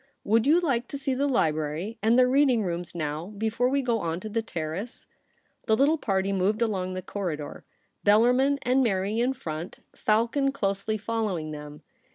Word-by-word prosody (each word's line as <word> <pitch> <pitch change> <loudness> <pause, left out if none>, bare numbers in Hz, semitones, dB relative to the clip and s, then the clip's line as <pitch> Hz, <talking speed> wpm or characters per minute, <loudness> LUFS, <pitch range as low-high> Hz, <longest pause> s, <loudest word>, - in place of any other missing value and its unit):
' - - -46
Would 225 +4 +2
you 320 +4 +6
like 265 -8 0
to 280 - -5
see 275 -1 -1
the 275 +2 0
library 160 - -1
and 225 +3 +3
the 255 - +6
reading 255 -3 +3
rooms 175 -1 -4
now, 155 +1 -3
before 225 +3 0
we 275 +1 +1
go 235 -2 +1
on 165 -2 -2
to 215 - -6
the 225 +2 -1
Terrace 180 +2 -5 0.3
?' - - -40
The 220 - +3
little 290 +5 +3
party 195 -3 0
moved 200 +4 +1
along 185 -5 -2
the 185 - -5
corridor, 170 -7 -5 0.4
Bellarmin 250 +7 +4
and 255 +2 +3
Mary 205 -2 0
in 250 +3 +2
front, 160 -6 -7
Falcon 235 +6 +1
closely 200 -3 -1
following 210 -8 -2
them. 150 0 -9
215 Hz, 185 wpm, -26 LUFS, 180-250 Hz, 0.4 s, you